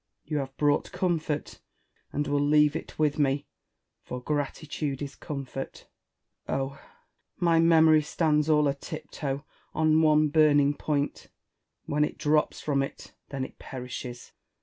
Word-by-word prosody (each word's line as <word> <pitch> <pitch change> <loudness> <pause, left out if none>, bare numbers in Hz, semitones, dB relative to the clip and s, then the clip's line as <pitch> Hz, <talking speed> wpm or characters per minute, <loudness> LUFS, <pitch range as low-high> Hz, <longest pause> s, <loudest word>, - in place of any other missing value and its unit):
You 150 0 -2
have 135 -1 -4
brought 145 -1 +2
comfort^ 160 -5 -2 0.5
and 145 - -1
will 145 0 +1
leave 150 +1 +4
it - - -6
with 150 -1 +1
me, 140 0 +1 0.6
for 125 - -6
gratitude 145 0 -3
is 145 -2 -6
comfort. 135 -2 -6 0.6
Oh 135 0 0
1 140 - -15 0.6
my 170 -2 +3
memory 160 -1 +6
stands 150 0 +1
all 150 -1 +4
a 140 - +2
tip 155 +3 -8
toe 140 -1 -3 0.3
on 155 0 +4
one 155 -1 +4
burning 145 -2 +4
point: 145 -1 -2 0.6
Avhen 150 +1 +2
it - - -2
drops 150 0 +1
from 140 -2 +1
it, 135 - -6 0.2
then 140 -2 -3
it - - -13
perishes. 125 -1 -7
150 Hz, 145 wpm, -28 LUFS, 140-155 Hz, 0.6 s, memory